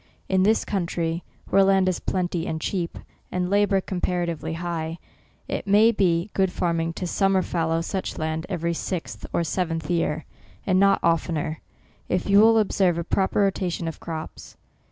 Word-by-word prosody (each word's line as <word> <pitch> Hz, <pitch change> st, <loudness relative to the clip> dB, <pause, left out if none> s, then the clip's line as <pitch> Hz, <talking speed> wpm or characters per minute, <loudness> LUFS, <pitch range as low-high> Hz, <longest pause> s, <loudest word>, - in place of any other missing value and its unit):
In 190 Hz, -1 st, +2 dB
this 215 Hz, +4 st, +3 dB
country, 170 Hz, -3 st, -2 dB, 0.3 s
where 195 Hz, -, +6 dB
land 195 Hz, -1 st, +4 dB
is 185 Hz, -, 0 dB
plenty 175 Hz, -2 st, -2 dB
and 160 Hz, -1 st, -2 dB
cheap, 175 Hz, +1 st, -3 dB, 0.3 s
and 180 Hz, 0 st, -1 dB
labour 205 Hz, -1 st, +3 dB
compa 180 Hz, -1 st, -1 dB
ratively 160 Hz, -1 st, -4 dB
high, 165 Hz, -1 st, -3 dB, 0.5 s
it -, -, -4 dB
may 210 Hz, +3 st, +6 dB
be 185 Hz, -2 st, +1 dB
good 190 Hz, -2 st, +2 dB
farming 165 Hz, -2 st, -1 dB
to 180 Hz, -, -4 dB
sum 195 Hz, +2 st, +1 dB
mer 190 Hz, -1 st, +3 dB
fallow 165 Hz, -1 st, 0 dB
such 190 Hz, +3 st, -3 dB
land 160 Hz, +1 st, -2 dB
every 170 Hz, -3 st, -1 dB
sixth 115 Hz, -, -4 dB
or 170 Hz, -, +1 dB
seventh 165 Hz, -1 st, -2 dB
year, 160 Hz, -2 st, 0 dB, 0.4 s
and 185 Hz, -1 st, +3 dB
not 195 Hz, 0 st, +5 dB
oftener, 165 Hz, -2 st, 0 dB, 0.5 s
if 180 Hz, -1 st, 0 dB
you 200 Hz, 0 st, +6 dB
will 225 Hz, +1 st, +6 dB
observe 190 Hz, -5 st, +2 dB
a 170 Hz, -, -1 dB
proper 195 Hz, +4 st, +1 dB
rotation 185 Hz, -4 st, 0 dB
of 165 Hz, -, -5 dB
crops. 160 Hz, -1 st, -7 dB
175 Hz, 170 wpm, -24 LUFS, 165-195 Hz, 0.5 s, where